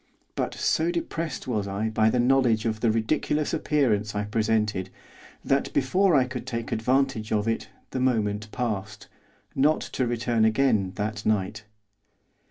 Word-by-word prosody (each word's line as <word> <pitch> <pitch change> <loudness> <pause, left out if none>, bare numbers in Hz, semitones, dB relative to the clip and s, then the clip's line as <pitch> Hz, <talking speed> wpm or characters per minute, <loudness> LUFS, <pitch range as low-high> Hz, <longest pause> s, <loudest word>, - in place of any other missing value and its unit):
But - - -2
so 160 +2 +1
depressed 170 -3 -3
was 105 -5 -1
I 100 +3 -2
by 110 0 +3
the 125 - 0
knowledge 120 -3 +3
of 110 -1 -1
the 115 - +2
ridiculous 130 +7 0
appearance 120 -10 +1
I 105 - 0
presented 105 -3 0 0.6
that, 135 0 +1
before 180 +7 +3
I 135 - +5
could 125 0 -6
take 115 -3 -4
advantage 125 -1 0
of 105 0 +1
it 115 - -1 0.2
the 130 - -2
moment 105 -4 0
passed, 105 -4 -4 0.5
not 150 +3 +3
to 130 - -2
return 115 -1 0
again 110 -4 +2
that 105 0 -3
night. 105 0 -1
115 Hz, 150 wpm, -26 LUFS, 105-130 Hz, 0.6 s, I